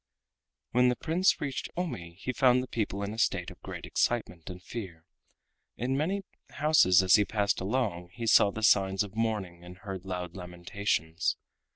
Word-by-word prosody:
When 125 Hz, +1 st, +4 dB
the 125 Hz, -, +1 dB
Prince 170 Hz, -, +1 dB
reached 140 Hz, -3 st, -3 dB
Omi 85 Hz, -, -4 dB
he 125 Hz, +5 st, -3 dB
found 125 Hz, -1 st, +4 dB
the -, -, -7 dB
people 100 Hz, -4 st, -2 dB
in 100 Hz, +1 st, -4 dB
a 110 Hz, -, -6 dB
state -, -, 0 dB
of -, -, -15 dB
great -, -, -7 dB
excitement 90 Hz, -9 st, -1 dB
and 90 Hz, 0 st, -7 dB
fear. 90 Hz, -4 st, -8 dB, 0.7 s
In 130 Hz, +3 st, -1 dB
many 185 Hz, +8 st, -1 dB, 0.3 s
houses 140 Hz, -, +4 dB
as 95 Hz, -, +4 dB
he 105 Hz, -, +7 dB
passed 100 Hz, -1 st, 0 dB
along 95 Hz, -5 st, -1 dB
he 115 Hz, +3 st, -6 dB
saw 105 Hz, -2 st, +6 dB
the 110 Hz, +2 st, -6 dB
signs 95 Hz, -1 st, +4 dB
of 100 Hz, -1 st, -9 dB
mourning 105 Hz, -6 st, -2 dB
and 90 Hz, +1 st, -11 dB
heard 95 Hz, -1 st, -7 dB
loud 90 Hz, -1 st, -5 dB
lamentations. 90 Hz, -1 st, -2 dB
100 Hz, 175 wpm, -29 LUFS, 90-125 Hz, 0.7 s, he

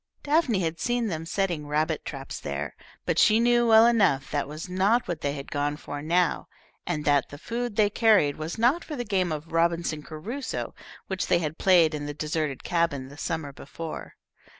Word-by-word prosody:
Daphne 285 Hz, -, +2 dB
had 165 Hz, -1 st, -2 dB
seen 240 Hz, -2 st, 0 dB
them 165 Hz, -2 st, -4 dB
setting 175 Hz, -5 st, -1 dB
rabbit 155 Hz, +1 st, 0 dB
traps 135 Hz, -2 st, -6 dB
there, 70 Hz, +1 st, -4 dB, 0.3 s
but -, -, +1 dB
she 215 Hz, +1 st, +5 dB
knew 240 Hz, 0 st, +3 dB
well 225 Hz, 0 st, +7 dB
enough 200 Hz, -, +3 dB
that 145 Hz, -2 st, -1 dB
was 155 Hz, +4 st, -7 dB
not 195 Hz, +6 st, +2 dB
what 175 Hz, -, -3 dB
they 140 Hz, 0 st, -1 dB
had 140 Hz, -1 st, -8 dB
gone 145 Hz, 0 st, -1 dB
for 145 Hz, -1 st, -7 dB
now, 170 Hz, +3 st, +1 dB, 0.4 s
and 155 Hz, -4 st, -2 dB
that 145 Hz, -2 st, +3 dB
the 145 Hz, -, -9 dB
food 235 Hz, +6 st, -4 dB
they 210 Hz, -1 st, +4 dB
carried 210 Hz, -11 st, +4 dB
was 155 Hz, +5 st, -5 dB
not 250 Hz, +9 st, +3 dB
for 305 Hz, -, -6 dB
the 245 Hz, -3 st, -4 dB
game 190 Hz, -4 st, 0 dB
of 155 Hz, +1 st, -5 dB
Robinson 165 Hz, -1 st, +1 dB
Crusoe, 215 Hz, -, -5 dB, 0.3 s
which 190 Hz, -1 st, -3 dB
they 180 Hz, -, +4 dB
had 160 Hz, -1 st, -3 dB
played 175 Hz, -4 st, +5 dB
in 145 Hz, -1 st, -4 dB
the 145 Hz, -, -5 dB
deserted 150 Hz, -2 st, -2 dB
cabin 165 Hz, -6 st, 0 dB
the 140 Hz, -, -12 dB
summer 160 Hz, -4 st, -3 dB
before. 160 Hz, +4 st, -8 dB
165 Hz, 195 wpm, -26 LUFS, 150-210 Hz, 0.4 s, well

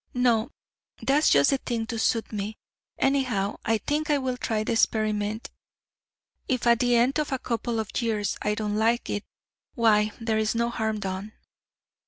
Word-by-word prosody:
No, 240 Hz, -2 st, +2 dB, 0.5 s
that's 290 Hz, +3 st, +3 dB
just 140 Hz, -1 st, +5 dB
the 275 Hz, -, +1 dB
thing 230 Hz, -3 st, -2 dB
to 230 Hz, -1 st, -4 dB
suit 225 Hz, 0 st, 0 dB
me; 210 Hz, +1 st, -4 dB, 0.4 s
anyhow, 250 Hz, -8 st, +1 dB
I 225 Hz, 0 st, +2 dB
think 300 Hz, +7 st, -2 dB
I 295 Hz, -, +4 dB
will 260 Hz, -2 st, -2 dB
try 220 Hz, -3 st, -1 dB
the -, -, -2 dB
experiment. 215 Hz, -1 st, 0 dB, 1.0 s
If 255 Hz, -3 st, -1 dB
at 235 Hz, -1 st, +5 dB
the 245 Hz, -1 st, +3 dB
end 250 Hz, +5 st, +3 dB
of 300 Hz, -, -2 dB
a 265 Hz, -, +1 dB
couple 235 Hz, -2 st, -2 dB
of 220 Hz, -, -4 dB
years 215 Hz, -3 st, -1 dB
I 210 Hz, 0 st, 0 dB
don't 210 Hz, -1 st, -2 dB
like 230 Hz, +2 st, +1 dB
it, 205 Hz, -, -2 dB, 0.5 s
why, 215 Hz, -3 st, +3 dB
there 225 Hz, -1 st, 0 dB
is 220 Hz, +1 st, 0 dB
no 235 Hz, +1 st, +1 dB
harm 220 Hz, -2 st, -2 dB
done." 195 Hz, +2 st, -4 dB
225 Hz, 175 wpm, -26 LUFS, 215-245 Hz, 1.0 s, just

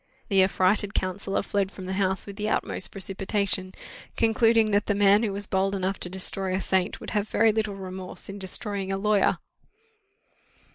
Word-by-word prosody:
The 195 Hz, -2 st, +5 dB
affrighted 195 Hz, +2 st, +2 dB
counsellor 195 Hz, +2 st, -1 dB
fled 200 Hz, -1 st, -1 dB
from 190 Hz, -, -9 dB
the 190 Hz, -, -3 dB
house 190 Hz, 0 st, 0 dB
with 200 Hz, -, -8 dB
the 210 Hz, +1 st, -2 dB
utmost 190 Hz, -, -1 dB
precipitation, 195 Hz, 0 st, -1 dB, 0.5 s
concluding 225 Hz, -1 st, +3 dB
that 205 Hz, 0 st, +1 dB
the 205 Hz, -, +1 dB
man 200 Hz, +1 st, +5 dB
who 220 Hz, -3 st, 0 dB
was 200 Hz, +1 st, -3 dB
bold 195 Hz, +1 st, 0 dB
enough 190 Hz, 0 st, -2 dB
to 180 Hz, -, -4 dB
destroy 190 Hz, 0 st, -1 dB
a -, -, 0 dB
saint, 190 Hz, +1 st, 0 dB
would -, -, -7 dB
have 210 Hz, -1 st, -1 dB
very 225 Hz, 0 st, +4 dB
little 215 Hz, -2 st, -2 dB
remorse 185 Hz, -1 st, -7 dB
in 200 Hz, 0 st, -7 dB
destroying 195 Hz, 0 st, -2 dB
a 195 Hz, -, -1 dB
lawyer. 210 Hz, 0 st, +2 dB
195 Hz, 180 wpm, -26 LUFS, 190-205 Hz, 0.5 s, The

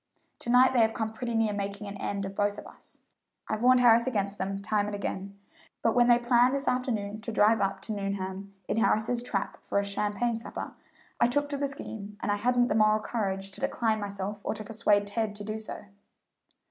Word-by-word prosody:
To -, -, -6 dB
night 255 Hz, +2 st, +6 dB
they 250 Hz, -, +3 dB
have 225 Hz, -1 st, +3 dB
come 220 Hz, -2 st, -2 dB
pretty 235 Hz, +1 st, -4 dB
near 225 Hz, -2 st, +2 dB
making 200 Hz, +1 st, -4 dB
an 200 Hz, 0 st, -6 dB
end 200 Hz, 0 st, -3 dB
of 195 Hz, -, -6 dB
both 205 Hz, +1 st, 0 dB
of -, -, -9 dB
us. -, -, -13 dB, 0.5 s
I've 215 Hz, 0 st, -2 dB
warned 250 Hz, 0 st, +5 dB
Harris 235 Hz, 0 st, +6 dB
against 200 Hz, -5 st, -1 dB
them 195 Hz, +1 st, -2 dB
time 205 Hz, 0 st, 0 dB
and 210 Hz, -, -3 dB
again, 200 Hz, 0 st, -5 dB, 0.5 s
but 225 Hz, -, +3 dB
when 240 Hz, -1 st, +4 dB
they 240 Hz, -1 st, +7 dB
planned 245 Hz, +2 st, +3 dB
this 275 Hz, 0 st, -3 dB
afternoon 215 Hz, -5 st, -1 dB
to 230 Hz, -, -5 dB
drive 215 Hz, +1 st, +4 dB
up 195 Hz, -1 st, -1 dB
to 220 Hz, -, -5 dB
Nuneham 195 Hz, -1 st, -4 dB, 0.2 s
in -, -, -1 dB
Harris's 225 Hz, +1 st, +2 dB
trap 215 Hz, -5 st, -3 dB
for -, -, -2 dB
a 200 Hz, -, +3 dB
champagne 210 Hz, +3 st, -1 dB
supper, 230 Hz, -, -6 dB, 0.5 s
I 235 Hz, -, +5 dB
took 290 Hz, +4 st, 0 dB
to 285 Hz, -, -2 dB
the 280 Hz, 0 st, 0 dB
scheme, 210 Hz, -6 st, -7 dB
and 205 Hz, -, -1 dB
I 205 Hz, -, +1 dB
hadn't 245 Hz, +3 st, +2 dB
the -, -, +2 dB
moral 215 Hz, 0 st, +4 dB
courage 195 Hz, -3 st, -3 dB
to -, -, -7 dB
decline 220 Hz, -2 st, 0 dB
myself 200 Hz, 0 st, -5 dB
or -, -, -2 dB
to 215 Hz, -, -5 dB
persuade 210 Hz, -2 st, +2 dB
Ted 210 Hz, 0 st, -2 dB
to 205 Hz, -, -7 dB
do 215 Hz, +1 st, -4 dB
so." 215 Hz, -, -8 dB
215 Hz, 220 wpm, -28 LUFS, 200-235 Hz, 0.5 s, they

